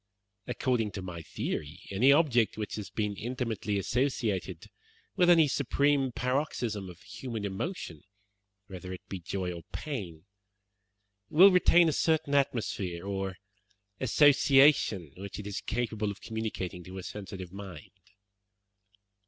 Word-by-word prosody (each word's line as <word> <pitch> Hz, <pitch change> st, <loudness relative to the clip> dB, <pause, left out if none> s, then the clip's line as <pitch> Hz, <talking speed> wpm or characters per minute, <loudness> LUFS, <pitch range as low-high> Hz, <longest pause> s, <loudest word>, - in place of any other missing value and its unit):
According 120 Hz, -5 st, 0 dB
to 95 Hz, -, -5 dB
my 85 Hz, -2 st, -6 dB
theory, 80 Hz, +1 st, -4 dB
any 120 Hz, +8 st, +5 dB
object 135 Hz, -9 st, +3 dB
which 105 Hz, -2 st, -4 dB
has 105 Hz, -2 st, -5 dB
been 105 Hz, -2 st, -2 dB
intimately 115 Hz, -2 st, -3 dB
associated 100 Hz, -, -1 dB, 0.5 s
with 180 Hz, -1 st, +4 dB
any 165 Hz, -3 st, +7 dB
supreme 140 Hz, 0 st, +1 dB
paroxysm 120 Hz, -6 st, -2 dB
of 90 Hz, -1 st, -13 dB
human 115 Hz, -5 st, -6 dB
emotion, 95 Hz, -, -4 dB, 0.6 s
whether 95 Hz, -3 st, -8 dB
it 90 Hz, -, -10 dB
be 95 Hz, -, -5 dB
joy 90 Hz, +1 st, -3 dB
or 85 Hz, -, -8 dB
pain, 95 Hz, -, -6 dB, 1.0 s
will 190 Hz, +6 st, +8 dB
retain 175 Hz, -1 st, +5 dB
a 155 Hz, -, +1 dB
certain 160 Hz, -3 st, +1 dB
atmosphere 100 Hz, -10 st, -1 dB
or 95 Hz, -1 st, -3 dB, 0.6 s
association 135 Hz, -, +4 dB
which 100 Hz, 0 st, -7 dB
it 105 Hz, -, -7 dB
is 100 Hz, -1 st, -4 dB
capable 110 Hz, -3 st, -2 dB
of 100 Hz, -, -6 dB
communicating 105 Hz, -5 st, -4 dB
to 90 Hz, +2 st, -9 dB
a 95 Hz, -, -6 dB
sensitive 95 Hz, -3 st, -7 dB
mind. 95 Hz, -2 st, -9 dB
105 Hz, 130 wpm, -30 LUFS, 95-135 Hz, 1.0 s, will